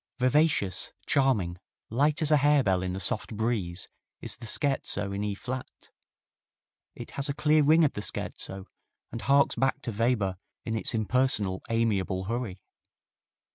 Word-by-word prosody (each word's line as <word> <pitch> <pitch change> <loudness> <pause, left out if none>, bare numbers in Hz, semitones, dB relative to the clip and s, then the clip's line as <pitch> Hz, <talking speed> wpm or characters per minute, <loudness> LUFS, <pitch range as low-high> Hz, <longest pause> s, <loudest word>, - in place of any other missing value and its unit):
Vivacious, 130 - +2
charming, 105 -11 +1 0.3
light 145 +6 +2
as 155 - +3
a 150 - +6
harebell 140 -10 +3
in 90 0 -3
the 95 - -4
soft 105 +2 0
breeze 105 -6 -1 0.3
is - - -2
the 115 - -10
Scherzo 110 -6 0
in 100 +1 -3
E 105 -1 -2
flat. 130 +4 -7 1.0
It - - -9
has 140 +1 -2
a 140 - -1
clear 155 0 +3
ring 155 +3 +5
of 150 - +2
the 105 - -4
scherzo 95 -1 -4 0.5
and 115 - -5
harks 140 +4 +3
back 135 +1 +1
to 120 - -3
Weber 105 -4 0 0.3
in 115 - -2
its 110 +2 0
impersonal, 110 -4 +1
amiable 105 -5 0
hurry. 105 -3 -4
115 Hz, 150 wpm, -28 LUFS, 100-140 Hz, 1.0 s, a